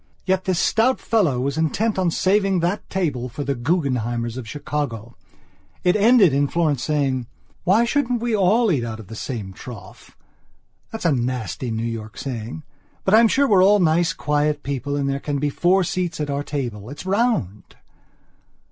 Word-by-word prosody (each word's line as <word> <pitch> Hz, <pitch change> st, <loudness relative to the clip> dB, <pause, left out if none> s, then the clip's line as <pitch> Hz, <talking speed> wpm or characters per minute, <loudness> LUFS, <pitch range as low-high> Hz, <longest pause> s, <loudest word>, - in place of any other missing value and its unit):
Yet 190 Hz, 0 st, 0 dB
this 185 Hz, -2 st, 0 dB
stout 230 Hz, +8 st, +2 dB
fellow 175 Hz, -, +1 dB
was 140 Hz, +4 st, -1 dB
intent 200 Hz, +7 st, 0 dB
on 180 Hz, -2 st, +2 dB
saving 195 Hz, +2 st, +2 dB
that 175 Hz, +4 st, -2 dB
table 145 Hz, -10 st, -2 dB
for 145 Hz, +5 st, -5 dB
the 140 Hz, -, -1 dB
Guggenheimers 120 Hz, -5 st, -1 dB
of 125 Hz, -4 st, -7 dB
Chicago. 130 Hz, -6 st, -4 dB, 0.7 s
It 180 Hz, +2 st, +3 dB
ended 210 Hz, -, +5 dB
in 140 Hz, +1 st, +2 dB
Florence 150 Hz, -5 st, 0 dB
saying: 135 Hz, -4 st, 0 dB, 0.4 s
"Why 210 Hz, +6 st, +4 dB
shouldn't 250 Hz, -1 st, 0 dB
we 235 Hz, -1 st, 0 dB
all 210 Hz, +3 st, +3 dB
eat 135 Hz, -7 st, 0 dB
out 110 Hz, -1 st, -5 dB
of 105 Hz, -, -12 dB
the 110 Hz, -, -8 dB
same 110 Hz, -5 st, -5 dB
trough?that's 120 Hz, -, -13 dB
a 165 Hz, -, +4 dB
nasty 125 Hz, -, -2 dB
New 115 Hz, 0 st, -2 dB
York 110 Hz, -2 st, -6 dB
saying. 125 Hz, +2 st, -5 dB, 0.4 s
But 190 Hz, -, +1 dB
I'm 225 Hz, +1 st, +7 dB
sure 280 Hz, +5 st, +2 dB
we're 195 Hz, -5 st, +5 dB
all 205 Hz, +2 st, +6 dB
nice 165 Hz, -1 st, +3 dB
quiet 150 Hz, -1 st, -1 dB
people 140 Hz, 0 st, -3 dB
and 140 Hz, -1 st, -1 dB
there 140 Hz, 0 st, -1 dB
can 145 Hz, 0 st, -3 dB
be 145 Hz, +1 st, -1 dB
four 185 Hz, +5 st, +3 dB
seats 175 Hz, -2 st, -2 dB
at 150 Hz, -1 st, -2 dB
our 140 Hz, 0 st, -1 dB
table. 120 Hz, -8 st, -5 dB
It's 145 Hz, +6 st, -9 dB
round." 190 Hz, -, -1 dB
150 Hz, 175 wpm, -22 LUFS, 125-190 Hz, 0.7 s, I'm